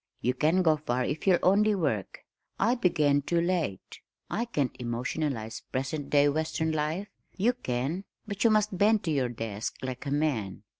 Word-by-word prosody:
You 125 - +1
can 160 +8 +2
go 160 -2 +4
far 125 -4 -1
if 155 +6 -3
you'll 185 -2 +6
only 210 +3 +4
work. 135 - -2 0.3
I 225 +5 +3
began 150 - +2
too 170 +4 0
late. 170 - -2 0.3
I 235 - 0
can't 145 - -1
emotionalize 120 0 -3
present 135 +3 -3
day 145 0 +5
western 160 +2 0
life 155 +6 -1 0.3
you 225 +6 +3
can, 145 - -3 0.2
but 200 -2 -3
you 230 - +6
must 215 -2 +2
bend 210 +3 +3
to 165 - -1
your 135 -4 +1
desk 110 -2 -4
like 130 +1 -5
a - - -2
man. 140 -10 -1
155 Hz, 170 wpm, -28 LUFS, 130-185 Hz, 0.3 s, you'll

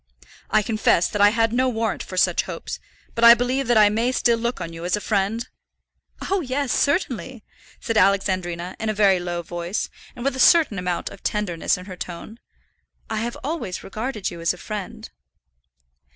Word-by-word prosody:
I 215 - +3
confess 215 -5 +2
that 210 - -2
I 205 - +8
had 225 +1 +1
no 255 +1 +2
warrant 225 -2 -2
for 185 - -7
such - - +3
hopes, - - -6 0.3
but 230 - -2
I 235 0 +10
believe 250 +2 -1
that 240 -1 +3
I 210 -1 +7
may 230 +4 +1
still 235 -2 +2
look 235 +2 -2
on 170 -2 -6
you 165 0 -8
as 180 +2 +1
a - - -3
friend?" 210 +2 -1 0.8
"Oh, 390 -1 +2
yes, 265 0 -1
certainly," 260 - -1 0.4
said 230 - -2
Alexandrina, 185 -3 +1
in 220 - -2
a 215 - -1
very 200 -3 +4
low 175 -1 -4
voice, 175 +3 -3 0.3
and 245 0 -7
with 275 -1 +1
a - - -6
certain 300 - +5
amount 180 -1 -2
of 200 - -12
tenderness 190 -7 -1
in 180 - -10
her 185 -2 -8
tone. 180 +6 -8 0.7
"I 220 - -1
have 235 +2 -3
always 280 - -4
regarded 215 0 -4
you 170 -1 -8
as 170 +1 +1
a - - -16
friend." 205 - -6
215 Hz, 190 wpm, -23 LUFS, 185-240 Hz, 0.8 s, I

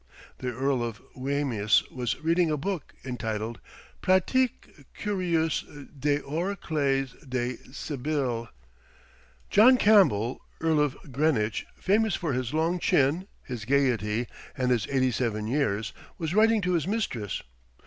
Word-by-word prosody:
The 125 -1 -2
Earl 130 +1 0
of 115 -2 -4 0.2
Wemyss 130 -6 +1
was 125 -3 -2
reading 165 +1 +2
a 150 - 0
book, 175 +1 -4
entitled 115 -2 -3 0.4
"Pratique 190 - +1
Curieuse 175 -6 0 0.4
des 145 +1 +1
Oracles 150 -5 -1 0.2
des 125 -1 -1
Sybilles." 135 -4 -2 1.0
John 245 +5 +7
Campbell, 155 - +4 0.2
Earl 160 -1 +2
of 145 -2 +1
Greenwich, 125 -6 +1
famous 215 +1 +2
for 160 -6 -2
his 125 -1 -2
long 165 +3 +1
chin, 170 +1 +2 0.2
his 125 -4 -6
gaiety, 120 -4 +1 0.3
and 125 -1 +1
his 120 -3 +1
eighty 130 -2 +2
seven 110 -3 -1
years, 110 -5 0 0.2
was 160 0 -3
writing 220 +1 +4
to 180 -1 0
his 165 -2 0
mistress. 160 - -2
140 Hz, 125 wpm, -27 LUFS, 120-170 Hz, 1.0 s, John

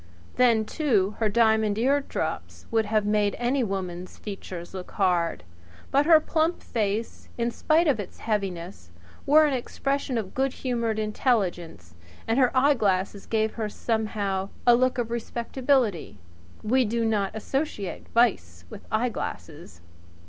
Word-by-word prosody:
Then, 235 -3 +4
too, 215 - +1
her 220 -2 +2
diamond 220 -1 +3
eardrops 275 +4 -1
would 225 -1 +2
have 215 -1 +1
made 210 -1 +1
any 250 +2 +1
woman's 185 -3 -5
features 185 -4 -8
look 185 -1 -7
hard; 175 - +1 0.5
but 285 +2 +3
her 325 -2 +8
plump 320 +2 0
face, 215 0 -3
in 235 0 0
spite 320 +8 +2
of 275 -7 +2
its 200 - -7
heaviness, 185 - -4 0.4
wore 305 +2 +7
an 295 - +1
expression 275 +1 -2
of 205 -4 -4
good 265 0 0
humoured 235 -4 -2
intelligence, 190 - -1 0.3
and 225 +4 +2
her 255 -2 +5
eyeglasses 205 -8 +1
gave 220 -1 0
her 220 -2 -3
somehow 205 -4 -2 0.2
a 240 - +7
look 255 +2 +1
of 235 -2 -2
respectability. 235 - -1 0.5
We 255 +4 +3
do 230 +1 -1
not 210 -2 0
associate 220 - -3
vice 90 - +1
with - - -11
eyeglasses. 165 - -4
220 Hz, 135 wpm, -26 LUFS, 195-250 Hz, 0.5 s, her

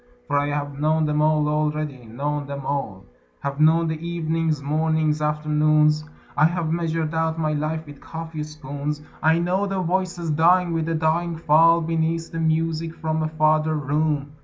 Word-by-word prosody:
For 145 0 +1
I 145 - 0
have 145 -1 -3
known 155 +1 +2
them 150 0 +1
all 155 -1 +3
already, 150 -3 -2
known 140 +5 -3
them 140 -1 -6
all: 110 -10 -3 0.4
Have 140 0 -4
known 165 +2 +4
the 160 -1 -3
evenings, 165 -2 -1
mornings, 155 +1 0
afternoons, 150 0 +2 0.3
I 150 - +5
have 170 -1 0
measured 165 -1 -1
out 160 0 0
my 155 -2 0
life 155 +2 -2
with 145 -1 -12
coffee 160 -1 -6
spoons; 150 0 -5 0.2
I 160 +1 +4
know 180 +4 0
the 195 -1 -2
voices 180 -2 -1
dying 170 +3 +3
with 165 0 -1
a 165 - 0
dying 165 +1 0
fall 165 +2 +5
Beneath 165 0 -1
the 165 - -4
music 160 0 0
from 160 0 -2
a 155 - 0
farther 155 0 +2
room. 145 0 -1
155 Hz, 170 wpm, -23 LUFS, 150-165 Hz, 0.4 s, I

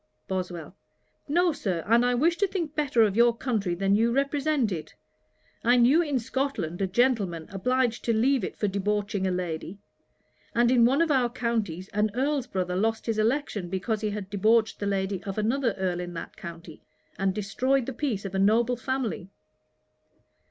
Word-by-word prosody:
BOSWELL. 180 -3 -4 0.5
'No, 345 +4 +3
Sir; 185 - -2
and 230 +2 +4
I 245 0 +2
wish 330 +7 +2
to 400 - +2
think 340 -6 -3
better 280 -7 +2
of 205 -2 +1
your 235 0 +4
country 210 -9 -1
than 195 +2 +1
you 225 +3 +3
represent 280 -2 +1
it. 165 -4 -6 0.7
I 245 +2 +4
knew 255 +8 +5
in 295 -5 0
Scotland 230 - -2
a 195 - +1
gentleman 195 -7 +1
obliged 245 +4 0
to 235 - +2
leave 245 +2 +2
it - - -5
for 210 - 0
debauching 200 0 -1
a - - 0
lady; 180 0 -4 0.8
and 240 +1 +4
in 240 -2 +5
one 275 +7 +3
of 325 - 0
our 255 -3 +3
counties 225 -8 -2
an 210 +1 +1
Earl's 275 0 0
brother 180 -5 -2
lost 220 +4 0
his 225 -2 -1
election, 220 -5 0
because 205 +4 -2
he 215 - 0
had 205 -2 -6
debauched 215 +2 +2
the 205 - -2
lady 195 -1 -1
of 195 0 -5
another 230 +2 +1
Earl 185 -2 -2
in 175 -1 -6
that 165 - -7
county, 170 -2 -10 0.4
and 190 -1 0
destroyed 250 +6 0
the 265 - -4
peace 235 -7 -2
of 195 - -5
a 190 - 0
noble 230 +5 +3
family.' 245 -7 -3
220 Hz, 180 wpm, -27 LUFS, 190-255 Hz, 0.8 s, knew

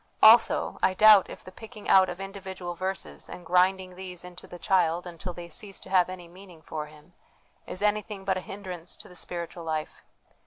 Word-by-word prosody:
Also, 225 +1 +6
I 185 - +2
doubt 210 -1 +7
if - - -10
the 185 - -11
picking 215 +2 -11
out 190 -1 +6
of - - -6
individual 190 -2 -6
verses, 190 +2 -5
and 180 - -9
grinding 185 +1 +2
these 180 -1 -6
into 180 0 -11
the 175 - -10
child 175 -2 +1
until 175 +1 -7
they 175 0 -9
cease 195 +4 -5
to 190 - -12
have 185 -2 +4
any 180 -2 -8
meaning 175 -2 -15
for 150 -1 -5
him, 150 +3 -18 0.5
is 185 - -4
anything 210 -1 -1
but 190 -1 +1
a 185 - -3
hindrance 185 -3 -7
to - - -12
the 180 - -15
spiritual 170 0 -5
life. 155 -1 -4
185 Hz, 195 wpm, -27 LUFS, 175-195 Hz, 0.5 s, doubt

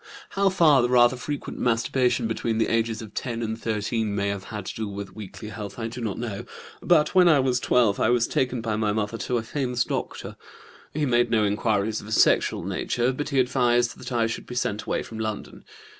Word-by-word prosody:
"How 195 0 +2
far 160 -8 +5
the 120 - +1
rather 120 0 +5
frequent 145 +3 -5
masturbation 125 +1 +1
between 115 0 -1
the 110 - +1
ages 115 -1 0
of 110 - -11
10 120 -2 -3
and 110 0 -2
13 110 -1 -2
may 100 0 0
have 100 -1 -4
had 105 -3 -6
to - - -6
do 110 -1 -3
with 100 -1 -7
weakly 105 0 -8
health 105 -1 -7
I 115 -1 -3
do 120 +2 -7
not 110 -4 -3
know, 110 -4 -4 0.4
but 160 -4 +3
when 180 -2 +6
I 150 -4 +5
was 130 -2 +1
12 115 -3 +2
I - - +3
was 120 -1 +3
taken 125 -2 -1
by 110 -2 -2
my 105 -1 0
mother 110 +1 -2
to 120 +5 -1
a 115 - -2
famous 125 0 -1
doctor. - - -5 0.5
He 150 0 -1
made 120 -2 +2
no 110 -2 +2
inquiries 105 +1 0
of - - -12
a - - -8
sexual 110 - +3
nature, 120 +1 -1
but 145 +3 -4
he 140 -2 +1
advised 120 -2 +2
that - - -8
I 120 -2 +2
should 115 - -4
be 125 - -7
sent 110 -4 -1
away - - -1
from 110 - -9
London. 110 -1 -5
115 Hz, 220 wpm, -25 LUFS, 110-125 Hz, 0.5 s, when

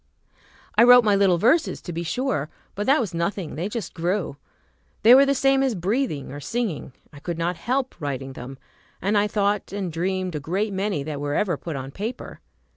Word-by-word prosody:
I - - +9
wrote 245 0 +8
my 210 -2 +3
little 195 -3 +4
verses, 255 - +2
to 175 - -6
be 170 - -3
sure, 170 - -2 0.2
but 205 +2 -4
that 275 +3 +5
was 210 -8 -2
nothing; 170 0 -2
they 175 +7 -3
just 230 0 -5
grew. 175 -2 -1 0.7
They 230 +3 +9
were 275 +2 +7
the 275 - +2
same 270 0 +3
as 265 -4 +1
breathing 185 - -1
or 145 - -7
singing. 185 - -3 0.2
I 145 - -11
could 170 +2 -4
not 170 +2 -1
help 255 +9 -1
writing 135 -2 -4
them, 130 +1 -9 0.4
and 200 +4 0
I 205 0 +3
thought 205 0 0
and 190 -4 -4
dreamed 185 +2 -2
a 150 - -3
great 195 +8 -2
many 190 -6 -1
that 145 -1 -5
were 145 0 -2
ever 190 -5 +1
put 160 +1 -6
on 135 0 -6
paper. 220 - -6
190 Hz, 200 wpm, -24 LUFS, 160-225 Hz, 0.7 s, I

